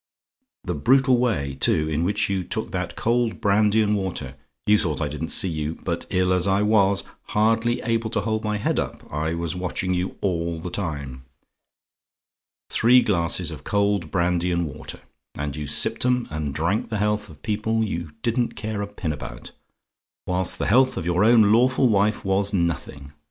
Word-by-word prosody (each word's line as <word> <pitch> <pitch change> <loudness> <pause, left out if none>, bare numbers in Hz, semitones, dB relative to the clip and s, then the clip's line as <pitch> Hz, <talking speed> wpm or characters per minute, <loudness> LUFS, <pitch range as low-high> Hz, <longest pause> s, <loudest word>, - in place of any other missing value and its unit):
The 90 - -2
brutal 130 - +3
way, 70 - 0
too, 75 - +2
in 80 +1 -1
which 100 +4 +1
you 95 -2 -1
took - - -4
that - - -3
cold 120 0 0
brandy 105 +2 +3
and 105 0 +1
water 90 -9 -3 0.3
you 105 0 +4
thought 80 -7 -1
I 75 - -1
didn't 75 +3 -4
see - - +4
you; 80 -1 -3
but - - -3
ill 90 0 +2
as 90 +1 +1
I 100 +1 +2
was, 100 -2 +3 0.2
hardly 115 +2 +1
able 115 -1 -1
to 105 - -1
hold 110 +1 -2
my 105 -1 -1
head 105 - 0
up, - - -4
I 80 +2 -1
was 85 +1 -3
watching 90 +1 -2
you 90 +1 -2
all 85 -3 -1
the 90 +2 -6
time. 70 -9 -5 1.5
Three 125 +2 +5
glasses 85 -6 0
of - - -9
cold 100 -4 0
brandy 90 +1 0
and 85 0 0
water; 75 0 -9 0.4
and 75 -1 -3
you 75 -1 -5
sipped 75 - +2
'em, 125 -1 +1
and 75 -2 -3
drank 85 +8 -1
the 110 - -2
health 105 0 -1
of 75 -2 -15
people 110 +1 -1
who - - +2
you 85 -6 -4
didn't 120 0 0
care 110 -1 -4
a 100 - -3
pin 95 -6 -4
about; - - -9 0.7
whilst 90 0 0
the - - -2
health 130 +5 +3
of - - -3
your 90 +3 +2
own 110 -2 +6
lawful 130 +3 +4
wife 105 0 +1
was 95 +1 +1
nothing. 75 -5 -3
95 Hz, 185 wpm, -23 LUFS, 85-110 Hz, 1.5 s, own